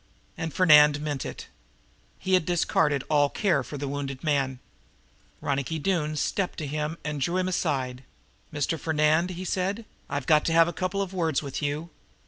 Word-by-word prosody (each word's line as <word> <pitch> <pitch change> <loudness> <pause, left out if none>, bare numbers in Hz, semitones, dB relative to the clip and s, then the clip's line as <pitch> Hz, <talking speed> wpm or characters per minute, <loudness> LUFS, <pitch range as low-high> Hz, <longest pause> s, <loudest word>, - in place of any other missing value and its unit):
And 160 0 -4
Fernand 150 -4 +6
meant 145 -3 -3
it. - - -8 0.7
He 190 - -2
had 185 - +5
discarded 155 -4 +1
all 145 -2 +3
care 170 -6 +1
for 145 - -7
the 140 0 -4
wounded 140 -1 -4
man. 135 -4 0 0.8
Ronicky 140 +3 -1
Doone 155 -2 0
stepped 185 +5 -1
to 155 - -3
him 150 +3 -3
and 150 -2 -3
drew 170 +6 0
him 185 0 0
aside. 135 -8 -1 0.5
"Mr. 150 +2 -1
Fernand," 155 +2 +2
he 185 +1 -6
said, 195 +5 -2 0.2
"I've 145 -2 -3
got 150 -1 +4
to 165 - +1
have 165 0 +6
a 175 - -3
couple 185 +3 -1
of 190 -1 -8
words 165 -5 0
with 140 0 -5
you." 150 +3 -3
155 Hz, 175 wpm, -26 LUFS, 145-175 Hz, 0.8 s, Fernand